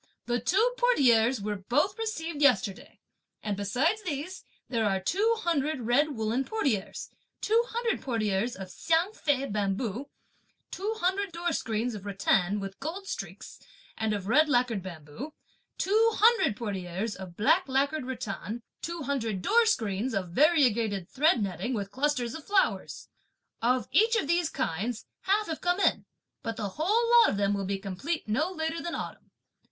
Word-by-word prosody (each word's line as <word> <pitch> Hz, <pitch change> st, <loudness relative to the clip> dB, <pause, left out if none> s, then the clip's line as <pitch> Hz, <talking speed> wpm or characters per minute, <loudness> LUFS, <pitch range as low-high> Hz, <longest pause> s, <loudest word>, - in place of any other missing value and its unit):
The 240 Hz, 0 st, 0 dB
two 395 Hz, -, +2 dB
portieres 255 Hz, -, +4 dB
were 205 Hz, 0 st, -2 dB
both 295 Hz, -, 0 dB
received 335 Hz, -9 st, -3 dB
yesterday; 205 Hz, -8 st, +1 dB, 0.4 s
and 210 Hz, -2 st, -1 dB
besides 255 Hz, -, 0 dB
these, 355 Hz, +1 st, -5 dB, 0.2 s
there 230 Hz, -3 st, 0 dB
are 195 Hz, -2 st, +2 dB
the 190 Hz, -, -9 dB
two 430 Hz, -, +2 dB
hundred 310 Hz, -4 st, 0 dB
red 275 Hz, +6 st, +2 dB
woollen 225 Hz, +4 st, 0 dB
portieres, 265 Hz, -, -2 dB, 0.3 s
two 455 Hz, +2 st, +3 dB
hundred 470 Hz, 0 st, -1 dB
portieres 225 Hz, -2 st, -1 dB
of 190 Hz, -1 st, -8 dB
Hsiang 335 Hz, +5 st, +1 dB
Fei 280 Hz, -8 st, 0 dB
bamboo; 210 Hz, +4 st, -2 dB, 0.6 s
two 420 Hz, +4 st, -3 dB
hundred 385 Hz, 0 st, 0 dB
door 340 Hz, 0 st, -2 dB
screens 230 Hz, -1 st, -1 dB
of 205 Hz, -1 st, -7 dB
rattan, 195 Hz, 0 st, +1 dB
with 195 Hz, -1 st, -7 dB
gold 335 Hz, +8 st, -5 dB
streaks, -, -, -7 dB, 0.4 s
and 220 Hz, -1 st, -1 dB
of 205 Hz, -3 st, -2 dB
red 305 Hz, +7 st, +4 dB
lacquered 245 Hz, -6 st, +2 dB
bamboo; 175 Hz, -, -8 dB, 0.4 s
two 440 Hz, +4 st, +3 dB
hundred 425 Hz, -, +4 dB
portieres 200 Hz, -1 st, -3 dB
of 185 Hz, -3 st, -10 dB
black 330 Hz, -, +3 dB
lacquered 275 Hz, +2 st, 0 dB
rattan; 230 Hz, -2 st, -5 dB, 0.2 s
two 340 Hz, -1 st, -4 dB
hundred 230 Hz, -9 st, -2 dB
door 460 Hz, +1 st, +4 dB
screens 225 Hz, -, 0 dB
of 185 Hz, -3 st, -2 dB
variegated 230 Hz, -, +3 dB
thread 275 Hz, -4 st, +3 dB
netting 200 Hz, +6 st, -2 dB
with 200 Hz, -2 st, -4 dB
clusters 260 Hz, -3 st, 0 dB
of 320 Hz, -, -7 dB
flowers. 400 Hz, +2 st, 0 dB, 0.5 s
Of 250 Hz, +2 st, +1 dB
each 455 Hz, +3 st, +4 dB
of 460 Hz, -, +1 dB
these 340 Hz, 0 st, +2 dB
kinds, 215 Hz, -, -3 dB, 0.2 s
half 410 Hz, +3 st, +2 dB
have 320 Hz, -4 st, -5 dB
come 355 Hz, +1 st, +1 dB
in, -, -, +2 dB, 0.4 s
but 225 Hz, 0 st, -4 dB
the 210 Hz, -3 st, -2 dB
whole 410 Hz, -, +1 dB
lot 465 Hz, -, +6 dB
of -, -, -1 dB
them 200 Hz, 0 st, +2 dB
will 200 Hz, -1 st, -2 dB
be 195 Hz, +1 st, -1 dB
complete 200 Hz, -, -4 dB
no 305 Hz, +12 st, 0 dB
later 320 Hz, -1 st, -3 dB
than 345 Hz, -, -4 dB
autumn. -, -, -7 dB
255 Hz, 160 wpm, -28 LUFS, 205-340 Hz, 0.6 s, lot